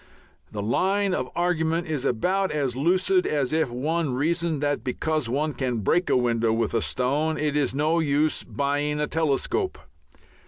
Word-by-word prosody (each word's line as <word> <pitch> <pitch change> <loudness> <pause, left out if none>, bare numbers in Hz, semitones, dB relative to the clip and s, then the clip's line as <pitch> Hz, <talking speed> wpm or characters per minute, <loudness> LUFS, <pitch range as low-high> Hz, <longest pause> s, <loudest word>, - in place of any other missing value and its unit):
The 105 -1 -4
line 190 - +1
of 130 -7 -2
argument 170 -1 0
is 150 -5 -3
about 185 +11 +1
as 140 -5 -1
lucid 185 - +2
as 145 -2 0
if 160 -4 +1
one 145 +3 -1
reasoned 165 +2 0
that 145 -5 0
because 150 +1 -1
one 150 +4 -1
can 125 -4 -2
break 175 - +1
a - - +4
window 115 -2 +1
with 115 +1 0
a 115 - +1
stone 145 +8 0
it 150 -1 -1
is 145 -2 +1
no 155 +4 +2
use 150 0 +1
buying 145 +1 -1
a 150 - +1
telescope. 160 - 0
150 Hz, 165 wpm, -25 LUFS, 130-165 Hz, -, a